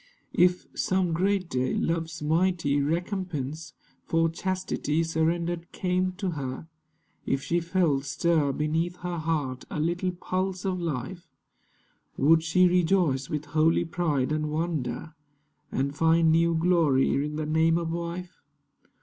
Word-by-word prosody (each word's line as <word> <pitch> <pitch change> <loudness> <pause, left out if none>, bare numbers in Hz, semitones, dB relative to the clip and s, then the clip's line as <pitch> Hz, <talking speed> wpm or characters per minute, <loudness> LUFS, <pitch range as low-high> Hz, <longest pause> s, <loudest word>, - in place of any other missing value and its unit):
If, 180 0 +3
some 185 -2 0
great 190 +2 +1
day, 130 -3 -1
love's 165 -1 -2
mighty 160 -2 +1
recompense 160 -2 -3 0.3
For 165 0 +1
chastity 165 -3 -1
surrendered 165 +1 -1
came 185 0 0
to 190 0 -3
her, 140 0 -5 0.6
If 135 - 0
she 170 - +1
felt 170 -5 +1
stir 155 0 +1
Beneath 160 +5 -1
her 175 -1 -3
heart 150 -5 -2
a - - -4
little 175 +4 0
pulse 185 +1 -3
of 185 -1 -1
life, 165 +3 -4 0.9
Would 160 +4 +5
she 180 +3 +4
rejoice 175 -6 +2
with 150 -1 -3
holy 160 +2 +3
pride 160 -6 0
and 155 0 -1
wonder, 155 -3 -3 0.6
And 140 +2 -1
find 165 +1 +4
new 165 +1 +3
glory 160 -5 +3
in 150 0 -4
the 155 0 -2
name 160 +2 +3
of 165 -1 -2
wife? 170 +2 -5
165 Hz, 130 wpm, -27 LUFS, 150-175 Hz, 0.9 s, Would